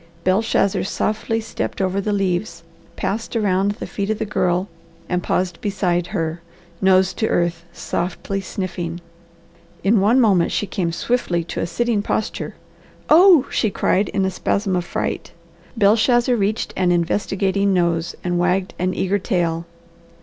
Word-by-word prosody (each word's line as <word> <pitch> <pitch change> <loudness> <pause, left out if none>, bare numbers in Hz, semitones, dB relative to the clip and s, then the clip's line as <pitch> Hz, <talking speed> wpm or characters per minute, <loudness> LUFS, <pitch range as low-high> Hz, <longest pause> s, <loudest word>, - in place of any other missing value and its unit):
Belshazzar 195 +1 +2
softly 215 +3 -1
stepped 225 - -4
over 190 +1 0
the 210 - -2
leaves, 185 -3 -1 0.3
passed 225 +4 -3
around 200 -2 +1
the - - -7
feet 200 0 -4
of 220 - 0
the - - -2
girl, 185 -2 0 0.4
and 180 0 0
paused 180 -1 -1
beside 185 -4 0
her, 165 -4 -3 0.4
nose 190 -1 +4
to 220 - -1
earth, 170 -1 0
softly 190 +3 -3
sniffing. 175 -3 -4 0.8
In 205 +2 +4
one 225 +6 +4
moment 195 -8 +3
she - - 0
came 180 -3 -2
swiftly 175 -3 0
to 165 - -5
a - - -1
sitting 230 +4 0
posture. 215 +1 -3 0.6
"Oh!" 335 -3 +7
she 220 - +1
cried 195 0 +1
in 195 - 0
a 190 - 0
spasm 195 +1 -1
of 175 -1 -1
fright. - - -3 0.4
Belshazzar 235 +4 +4
reached 210 0 -1
an 180 -1 +2
investigating 195 +3 +1
nose 170 -2 0
and 175 -1 0
wagged 180 +2 +1
an 185 +1 0
eager 195 +2 0
tail. 170 -4 -1
190 Hz, 150 wpm, -21 LUFS, 175-210 Hz, 0.8 s, Oh